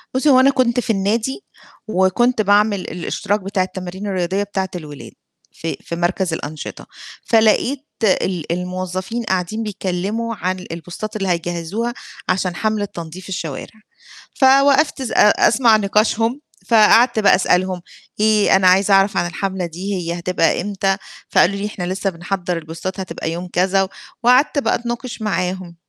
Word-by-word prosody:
بُصّي، 280 Hz, +3 st, +2 dB
هو 260 Hz, -2 st, +7 dB
أنا 265 Hz, +1 st, +6 dB
كنت 250 Hz, -3 st, +2 dB
في 245 Hz, -, -4 dB
النادي 225 Hz, -, 0 dB, 0.4 s
وكنت 215 Hz, +5 st, +2 dB
باعمل 205 Hz, 0 st, +3 dB
الاشتراك 185 Hz, +3 st, -2 dB
بتاع 195 Hz, 0 st, -1 dB
التمارين 185 Hz, +2 st, -6 dB
الرياضية 190 Hz, +1 st, -1 dB
بتاعة 195 Hz, -2 st, -3 dB
الولاد، 150 Hz, -5 st, -8 dB, 0.4 s
في 165 Hz, -, -5 dB
في 170 Hz, -, -5 dB
مَركَز 175 Hz, +1 st, -1 dB
الأنشطة، 155 Hz, -1 st, -6 dB, 0.4 s
فلقيت 235 Hz, +5 st, +2 dB, 0.2 s
ال 185 Hz, -4 st, 0 dB
الموظفين 185 Hz, +5 st, -3 dB
قاعدين 190 Hz, +2 st, -2 dB
بيتكلّموا 210 Hz, +3 st, -3 dB
عن 185 Hz, -1 st, -3 dB
البوستات 175 Hz, +6 st, -7 dB
اللي 195 Hz, -2 st, -2 dB
هيجهزوها 175 Hz, +6 st, -2 dB, 0.4 s
عشان 185 Hz, -1 st, 0 dB
حملة 215 Hz, +1 st, -1 dB
تنضيف 175 Hz, 0 st, -9 dB
الشوارع، 175 Hz, +4 st, -6 dB, 0.5 s
فوقفت 275 Hz, +2 st, +4 dB
س 240 Hz, -, -4 dB
أ 210 Hz, -, +5 dB, 0.2 s
أسمع 230 Hz, -3 st, +4 dB
نقاشهم 220 Hz, +5 st, +1 dB, 0.3 s
فقعدت 230 Hz, +1 st, +5 dB
بقى 205 Hz, -, +5 dB
أسألهم: 185 Hz, -1 st, +1 dB, 0.4 s
"إيه، 215 Hz, -2 st, +4 dB
أنا 190 Hz, -1 st, +4 dB
عايزة 195 Hz, +2 st, +4 dB
أعرَف 195 Hz, +1 st, +4 dB
عن 175 Hz, 0 st, +1 dB
الحملة 190 Hz, 0 st, -3 dB
دي، 180 Hz, +4 st, -5 dB
هي 170 Hz, -1 st, -3 dB
هتبقى 175 Hz, -1 st, +1 dB
إمتى؟" 195 Hz, 0 st, -1 dB, 0.3 s
فقالوا 190 Hz, +3 st, +3 dB
لي: 200 Hz, +1 st, -3 dB
"إحنا 210 Hz, -3 st, -5 dB
لسّه 195 Hz, +1 st, -1 dB
بنحضَّر 180 Hz, 0 st, -3 dB
البوستات 165 Hz, +4 st, -6 dB
هتبقى 165 Hz, -3 st, -4 dB
يوم 175 Hz, +2 st, -5 dB
كذا." 190 Hz, +1 st, +2 dB, 0.3 s
وقعدت 255 Hz, +5 st, +4 dB
بقى -, -, +1 dB
أتناقش 240 Hz, 0 st, -5 dB
معاهم. 185 Hz, -4 st, -2 dB
195 Hz, 145 wpm, -19 LUFS, 180-220 Hz, 0.5 s, هو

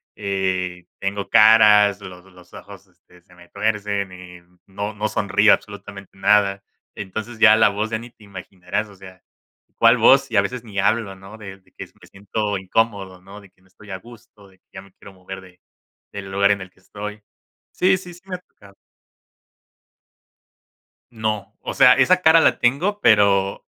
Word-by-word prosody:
eh, 95 Hz, -2 st, -3 dB
tengo 100 Hz, +1 st, -4 dB
caras, 105 Hz, -2 st, +5 dB
lo 90 Hz, -1 st, -11 dB
los 90 Hz, -1 st, -20 dB
ojos, -, -, -13 dB
este 90 Hz, 0 st, -25 dB
se 90 Hz, -, -23 dB
me 85 Hz, 0 st, -19 dB
tuercen, 100 Hz, -2 st, -2 dB
y 90 Hz, -1 st, -13 dB, 0.3 s
no 100 Hz, +2 st, -6 dB
no 105 Hz, +1 st, -3 dB
sonrío 105 Hz, +1 st, +3 dB
absolutamente 100 Hz, -1 st, -8 dB
nada. 100 Hz, 0 st, +2 dB, 0.3 s
Entonces, 110 Hz, +4 st, -7 dB
ya 110 Hz, -1 st, +7 dB
la 110 Hz, -, +4 dB
voz 105 Hz, +2 st, -3 dB
ya 110 Hz, -, -2 dB
ni 120 Hz, 0 st, -12 dB
te 110 Hz, -, -22 dB
imaginarás, 95 Hz, +1 st, -6 dB
o 100 Hz, -, -16 dB
sea, 95 Hz, -1 st, -15 dB, 0.5 s
¿cuál 115 Hz, +1 st, +5 dB
voz?, 135 Hz, +4 st, +4 dB
y 105 Hz, -, 0 dB
a -, -, +6 dB
veces 120 Hz, +4 st, -5 dB
ni 105 Hz, -3 st, -12 dB
hablo, 105 Hz, -1 st, 0 dB
¿no? 95 Hz, +3 st, -14 dB
De 100 Hz, -2 st, -10 dB
de 95 Hz, -, -30 dB
que -, -, -10 dB
me -, -, -18 dB
siento 100 Hz, +1 st, -4 dB
incómodo, 95 Hz, -2 st, -2 dB
¿no? 100 Hz, +2 st, -13 dB
De 100 Hz, -, -18 dB
que 95 Hz, -, -36 dB
no 95 Hz, -, -28 dB
estoy 105 Hz, +3 st, -19 dB
a 95 Hz, -, -5 dB
gusto, 115 Hz, -1 st, -18 dB
de 95 Hz, -1 st, -26 dB
que -, -, -70 dB
ya 95 Hz, -, -9 dB
me 100 Hz, -, -20 dB
quiero 100 Hz, -, -16 dB
mover 95 Hz, +1 st, -10 dB
de 90 Hz, -1 st, -19 dB, 0.5 s
del 95 Hz, -1 st, -8 dB
lugar 100 Hz, +1 st, +2 dB
en 100 Hz, -1 st, -1 dB
el 95 Hz, -, -9 dB
que 95 Hz, -, -31 dB
estoy. 105 Hz, +2 st, -9 dB, 0.5 s
Sí 190 Hz, +1 st, +2 dB
sí 180 Hz, -1 st, -11 dB
sí 175 Hz, -, -16 dB
me 185 Hz, -1 st, -6 dB
ha -, -, -5 dB
tocado. 100 Hz, -, -22 dB, 2.4 s
No, 110 Hz, -2 st, -4 dB
o -, -, -5 dB
sea, 125 Hz, -2 st, +6 dB
esa 135 Hz, +8 st, +3 dB
cara 165 Hz, -1 st, +5 dB
la -, -, +2 dB
tengo, 170 Hz, +12 st, 0 dB
pero, 100 Hz, -, +2 dB
100 Hz, 185 wpm, -20 LUFS, 95-110 Hz, 2.4 s, ya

